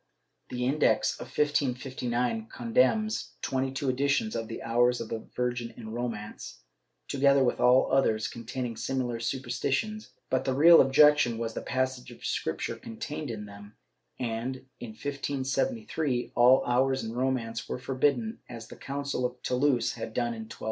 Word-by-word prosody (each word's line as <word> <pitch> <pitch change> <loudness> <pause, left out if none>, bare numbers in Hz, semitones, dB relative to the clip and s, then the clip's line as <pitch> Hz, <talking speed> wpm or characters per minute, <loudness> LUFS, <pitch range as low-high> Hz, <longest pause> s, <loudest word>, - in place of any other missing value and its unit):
The 125 0 -2
Index 140 +4 +2
of - - -7
1559 130 - -1
con 230 +1 -7
demns 220 -3 +2
twenty 130 0 0
two 135 +1 -3
editions 140 - +1
of 115 - -3
the 115 - -6
Hours 120 +1 +2
of 115 - -5
the 115 - -3 0.2
Virgin 120 -1 -2
in 110 -2 -8
Romance, 115 -3 -5 0.4
together 140 0 +4
with 125 - +1
all 125 +1 +5
others 110 -5 +2
containing 120 0 -5
similar 125 -3 -2
superstitions, 135 - -2 0.2
but 130 0 +2
the 130 -1 0
real 165 +4 +8
objection 135 -3 +5
was 115 -1 -3
the - - -4
passages 130 -2 -2
of - - -11
Scripture - - -2
contained 145 +5 -6
in 105 -2 -5
them, 100 +1 -12 0.4
and, 125 +2 -3
in 115 -3 -7
1573, 140 - -2
all 125 +2 +5
Hours 130 +2 +2
in 110 0 -5
Romance 120 -3 -2
were - - -2
forbidden, 145 - 0
as 115 -2 -9
the - - -10
Coun 140 +1 -5
cil 140 -2 -2
of 125 0 -2
Toulouse 125 -2 +1
had 110 - -7
done 120 -1 0
in 110 -1 -7
1229. - - -11
130 Hz, 160 wpm, -28 LUFS, 120-140 Hz, 0.4 s, real